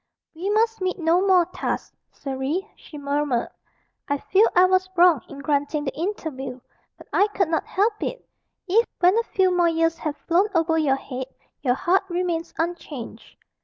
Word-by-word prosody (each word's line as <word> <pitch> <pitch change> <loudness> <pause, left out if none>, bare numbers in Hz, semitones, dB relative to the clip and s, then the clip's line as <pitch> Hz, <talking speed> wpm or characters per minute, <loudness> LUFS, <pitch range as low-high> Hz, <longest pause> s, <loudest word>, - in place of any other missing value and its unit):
"We 350 +5 -4
must 445 0 +1
meet 370 0 -1
no 340 +1 +2
more 365 -3 +5
thus, - - -2 0.2
Surrey," 275 +8 -3
she 300 - -12
murmured: 285 -3 -1 0.6
"I 285 - 0
feel 395 +9 +3
I 360 +1 +7
was 370 0 +2
wrong 345 -6 +5
in 280 0 -9
granting 290 0 0
the 270 - -4
interview, 290 -8 -4 0.4
but - - -14
I 405 - +4
could 385 -5 -1
not 325 - -1
help 420 +3 0
it. - - -4 0.4
If, 445 +6 +3
when 365 +2 +4
a - - 0
few 375 -4 +1
more 350 -1 +4
years 330 0 +1
have 300 -2 -3
flown 355 +4 +3
over 330 0 +2
your 300 -4 +2
head, 260 -1 -6 0.3
your 250 -3 +2
heart 375 +5 +2
remains 345 -1 -2
unchanged." 325 -7 -5
335 Hz, 170 wpm, -23 LUFS, 290-370 Hz, 0.6 s, I